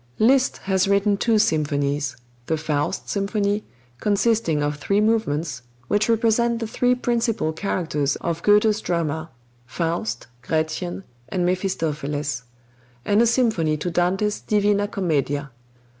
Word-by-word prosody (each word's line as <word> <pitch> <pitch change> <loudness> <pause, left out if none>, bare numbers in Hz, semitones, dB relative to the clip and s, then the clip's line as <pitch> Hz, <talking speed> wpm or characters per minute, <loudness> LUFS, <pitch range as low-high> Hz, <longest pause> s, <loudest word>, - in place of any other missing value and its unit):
Liszt 260 +4 +3
has 190 -1 +1
written 200 +1 +3
two 225 +2 +2
symphonies: 145 - 0 0.3
the 160 - +1
"Faust 150 -1 -2
Symphony," 205 +1 0 0.4
consisting 205 -7 +1
of 145 0 -1
three 200 +7 +1
movements, 190 - 0 0.3
which 210 +2 +2
represent 230 +1 +2
the 230 - -3
three 245 +3 +1
principal 230 -8 0
characters 155 -5 -1
of 170 -1 -3
Goethe's 210 +2 +4
drama, 160 -2 -2 0.4
Faust, 140 -5 -2 0.2
Gretchen, 160 +6 -2 0.3
and 180 -2 0
Mephistopheles; 150 -7 -1 0.6
and 205 +2 +3
a 235 - +4
symphony 220 -11 +2
to 175 +4 -3
Dante's 190 +5 +1
"Divina 205 -1 +1
Commedia." 145 -7 -1
185 Hz, 120 wpm, -23 LUFS, 155-210 Hz, 0.6 s, Goethe's